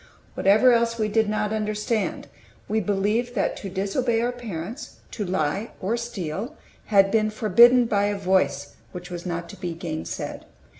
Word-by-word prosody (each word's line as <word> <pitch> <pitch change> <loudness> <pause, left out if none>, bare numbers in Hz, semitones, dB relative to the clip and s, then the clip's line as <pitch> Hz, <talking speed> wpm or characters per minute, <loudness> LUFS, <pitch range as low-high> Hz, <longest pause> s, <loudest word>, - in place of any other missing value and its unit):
Whatever 220 +6 +5
else 230 0 +1
we 215 -2 0
did 220 0 +2
not 210 0 -1
understand, 215 0 -2 0.4
we 220 - +1
believed 210 +5 0
that - - 0
to 195 - -6
disobey 200 +5 0
our 240 +2 0
parents, 230 - -7 0.2
to 210 - -4
lie 185 +3 -2
or 205 +5 -1
steal, 235 - -5 0.3
had 195 -2 +4
been 215 -1 +2
forbidden 235 +3 +5
by 205 -3 +1
a 205 0 -1
Voice 160 -8 0 0.2
which 180 0 -8
was 175 +1 -6
not 170 -1 -3
to - - -9
be 175 -2 -4
gainsaid. 165 -2 -5
210 Hz, 160 wpm, -24 LUFS, 185-230 Hz, 0.4 s, Whatever